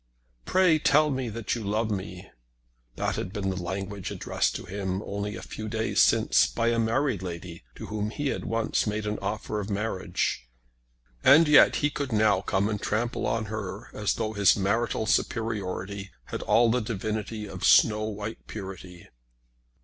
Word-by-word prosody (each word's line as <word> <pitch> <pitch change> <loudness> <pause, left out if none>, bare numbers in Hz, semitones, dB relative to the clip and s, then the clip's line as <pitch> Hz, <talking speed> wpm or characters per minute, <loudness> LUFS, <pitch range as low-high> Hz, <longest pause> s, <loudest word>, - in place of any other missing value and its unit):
"Pray 180 -4 +4
tell 150 0 +4
me 130 -3 -2
that 110 -1 -3
you 115 - -3
love 110 +2 -1
me!" 95 -2 -5 0.7
That - - -1
had 95 - -4
been 100 -2 -2
the 95 -1 -4
language 95 +2 -4
addressed - - -1
to - - -6
him 95 +1 -3
only 100 +1 -4
a - - -8
few 110 0 -6
days 110 0 +1
since - - +4
by 115 - 0
a 115 0 +1
married 115 -1 +1
lady 85 -1 -7
to - - -8
whom 105 0 -3
he 145 +5 -2
had - - -3
once 115 0 0
made 105 0 -2
an 105 0 -2
offer 105 +1 -3
of 100 0 -5
marriage; 100 - -2 0.7
and 160 +4 +7
yet 150 - +7
he 150 - +1
could 140 -3 -4
now 105 -3 +3
come 100 +1 0
and 105 -1 -3
trample 120 +3 -1
on 115 -1 -1
her 105 -1 -6
as 105 -1 0
though 110 -1 -2
his 100 -2 +4
marital 110 +3 0
superiority 100 -3 -2 0.2
had - - -5
all 115 0 +4
the 125 +1 +1
divinity 110 0 -3
of 95 -2 -8
snow 110 -1 +5
white 105 +1 -6
purity. 95 -4 -8
105 Hz, 170 wpm, -27 LUFS, 95-115 Hz, 0.7 s, and